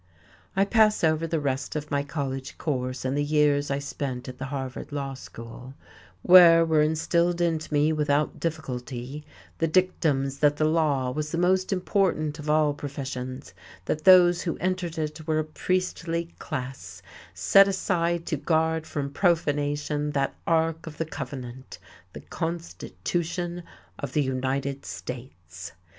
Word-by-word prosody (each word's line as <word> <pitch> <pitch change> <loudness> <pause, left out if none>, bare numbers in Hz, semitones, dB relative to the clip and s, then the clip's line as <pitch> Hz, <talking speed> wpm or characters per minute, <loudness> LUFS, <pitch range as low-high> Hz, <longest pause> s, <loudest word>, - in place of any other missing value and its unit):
I 195 +1 +3
pass 215 -1 +3
over 160 0 +2
the 165 -1 0
rest 135 -1 -2
of 150 0 -4
my 140 0 +1
college 135 -2 -4
course, 130 -4 -3
and 130 +1 0
the 145 - +1
years 145 -1 +2
I 140 - 0
spent 140 -2 -4
at 125 0 -8
the 130 - -3
Harvard 135 0 -5
Law 140 -2 -3
School, 125 0 -10 0.5
where 170 -2 +8
were 160 -2 +3
instilled 170 +3 +1
into 160 -3 0
me 150 +1 +3
without 150 -1 0
difficulty 135 -3 -4 0.4
the 165 - +2
dictums 155 -6 +1
that 145 -1 +3
the 155 - +2
law 150 -5 +1
was 150 +2 -3
the 165 - -2
most 185 +2 +2
important 180 -5 0
of 150 0 -5
all 150 -1 +3
professions, 135 -2 -6 0.3
that 155 +8 -2
those 175 -2 +7
who 170 - -2
entered 185 -2 -2
it 155 0 -4
were 155 -1 +1
a 155 - +1
priestly 170 +1 -2
class 125 - -6 0.3
set 145 - +6
aside 175 -3 0
to 155 - -1
guard 160 +1 0
from 140 -2 -3
profanation 150 -3 0
that 140 -1 0
Ark 165 0 +1
of 150 -2 -8
the 165 - -1
Covenant, 130 -4 -7 0.4
the - - -8
Constitution 175 +1 -4 0.4
of - - -5
the 150 - +2
United 135 +1 -2
States. 90 -9 -8
150 Hz, 150 wpm, -26 LUFS, 135-165 Hz, 0.5 s, where